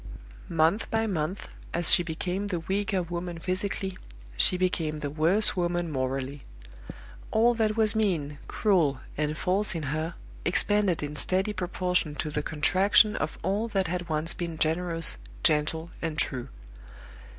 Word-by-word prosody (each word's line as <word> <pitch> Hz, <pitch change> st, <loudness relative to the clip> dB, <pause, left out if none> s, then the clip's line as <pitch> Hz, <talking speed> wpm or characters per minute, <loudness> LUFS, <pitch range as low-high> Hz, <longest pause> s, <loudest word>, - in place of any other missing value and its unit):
Month 165 Hz, +6 st, +2 dB
by 225 Hz, 0 st, +1 dB
month, 185 Hz, -2 st, -2 dB, 0.3 s
as 170 Hz, -1 st, +4 dB
she -, -, +5 dB
became 180 Hz, +4 st, -3 dB
the 180 Hz, -4 st, -2 dB
weaker 195 Hz, +1 st, -1 dB
woman 175 Hz, 0 st, -5 dB
physically, 185 Hz, +2 st, -2 dB, 0.4 s
she 180 Hz, -, +4 dB
became 165 Hz, -4 st, -1 dB
the 145 Hz, -, -3 dB
worse 170 Hz, +8 st, +2 dB
woman 175 Hz, -2 st, -1 dB
morally. 135 Hz, +1 st, -2 dB, 0.9 s
All 235 Hz, +2 st, +4 dB
that 220 Hz, -1 st, 0 dB
was 215 Hz, -2 st, +4 dB
mean, 160 Hz, -10 st, 0 dB
cruel, 165 Hz, -10 st, +2 dB, 0.2 s
and 150 Hz, +1 st, -1 dB
false 195 Hz, +2 st, +1 dB
in 160 Hz, -, -3 dB
her 160 Hz, +2 st, -3 dB, 0.3 s
expanded 190 Hz, -1 st, +3 dB
in 145 Hz, 0 st, -4 dB
steady 190 Hz, +7 st, 0 dB
proportion 180 Hz, -4 st, 0 dB
to 150 Hz, -, -3 dB
the 150 Hz, -, -1 dB
contraction 190 Hz, +8 st, +3 dB
of 155 Hz, -, -3 dB
all 200 Hz, +6 st, 0 dB
that 195 Hz, -4 st, 0 dB
had 175 Hz, 0 st, -3 dB
once 155 Hz, +1 st, +1 dB
been 170 Hz, -2 st, -5 dB
generous, 165 Hz, -, 0 dB, 0.3 s
gentle, 160 Hz, +3 st, +1 dB
and 160 Hz, -2 st, -3 dB
true. 130 Hz, -5 st, 0 dB
175 Hz, 145 wpm, -27 LUFS, 155-195 Hz, 0.9 s, she